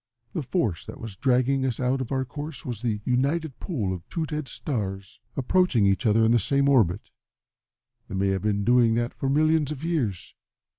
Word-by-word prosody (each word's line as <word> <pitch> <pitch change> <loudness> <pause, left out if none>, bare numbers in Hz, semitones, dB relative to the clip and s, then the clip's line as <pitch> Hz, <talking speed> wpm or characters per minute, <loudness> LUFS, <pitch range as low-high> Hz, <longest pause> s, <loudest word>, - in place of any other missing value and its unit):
The 165 - -1
force 125 - -1
that 145 - -8
was 115 -5 -7
dragging 130 +3 +2
us 130 -3 -1
out 130 +1 +1
of 130 - -5
our 130 -1 0
course 145 +4 -7
was 120 -4 -5
the 110 -4 -1
united 140 +4 0
pull 110 - -2
of 90 - -5
two 165 -2 -2
dead 150 -2 -4
stars 100 -7 -4 0.2
approaching 135 - +3
each 100 +4 +2
other 110 +1 +4
in 110 - +4
the 120 - +5
same 140 +6 +2
orbit. 110 -9 +2 1.0
They - - -6
may 95 +1 +1
have 95 0 0
been 105 -1 0
doing 120 0 +4
that 120 +1 -1
for 135 - -2
millions 155 +1 +2
of 150 0 -6
years. 120 - -2
125 Hz, 195 wpm, -26 LUFS, 105-140 Hz, 1.0 s, the